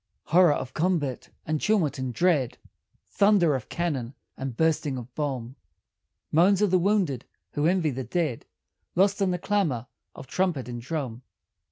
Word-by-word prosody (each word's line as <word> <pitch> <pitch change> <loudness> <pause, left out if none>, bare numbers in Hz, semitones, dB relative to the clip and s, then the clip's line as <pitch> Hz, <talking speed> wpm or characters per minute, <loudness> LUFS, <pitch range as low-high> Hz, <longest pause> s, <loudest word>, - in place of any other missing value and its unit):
Horror 175 -1 +5
of 130 -2 -4
combat, 155 -6 -1 0.2
and 155 -1 -1
tumult 195 -11 +1
and 130 -1 -2
dread; 145 -2 +1 0.5
Thunder 200 -6 +3
of 130 -5 -4
cannon 140 -7 -2 0.2
and 135 -3 -5
bursting 155 -4 +1
of 120 0 -9
bomb; 130 -4 -3 0.7
Moans 185 +5 +4
of 205 - +2
the 185 - +4
wounded 180 - +1 0.3
(who 145 +2 +1
envy 175 -4 +2
the 130 0 -4
dead) 155 -6 -2 0.5
Lost 195 +3 +3
in 195 - +3
the 180 - 0
clamor 175 - 0 0.3
of - - -9
trumpet 165 -7 -1
and 120 -1 -6
drum. 130 -4 -4
155 Hz, 155 wpm, -26 LUFS, 130-180 Hz, 0.7 s, Horror